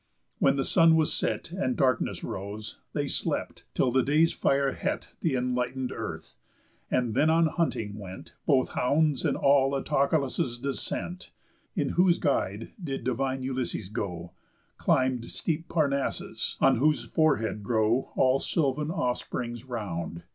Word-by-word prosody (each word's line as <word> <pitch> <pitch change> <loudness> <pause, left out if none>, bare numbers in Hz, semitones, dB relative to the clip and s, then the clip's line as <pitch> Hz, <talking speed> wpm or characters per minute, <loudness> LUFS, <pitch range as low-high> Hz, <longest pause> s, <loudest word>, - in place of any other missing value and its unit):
When 135 - +4
the 135 - 0
sun 165 0 +5
was 160 -1 +2
set, - - -2
And 175 -9 -1
darkness 130 -3 +1
rose, 100 +3 -6
they - - -1
slept, - - -2
till 125 - +2
day's 145 +6 +3
fire 140 0 +2
het - - -3
Th' 155 -5 +1
enlighten'd 125 +1 -1
earth; - - -6 0.5
and 125 -3 +1
then 150 +7 +3
on 165 +1 +4
hunting 120 - -1
went 95 -4 -9
Both 135 -4 +3
hounds 145 +1 +1
and - - +1
all 140 0 +4
Autolycus' 140 -3 0
descent. 140 +7 -4 0.5
In - - 0
whose 180 -1 +4
guide 110 -6 -1
did 135 -4 -3
divine 130 +1 -1
Ulysses 130 -6 -3
go, 90 -5 -4 0.4
Climb'd 130 -2 +1
steep 165 0 -3
Parnassus, 140 -4 -1
on - - +5
whose 150 +4 +2
forehead 115 -9 +1
grow 110 +3 +1
All 130 +1 +4
sylvan 150 -1 0
offsprings 125 - -3
round. 85 -9 -4
130 Hz, 135 wpm, -28 LUFS, 115-150 Hz, 0.5 s, sun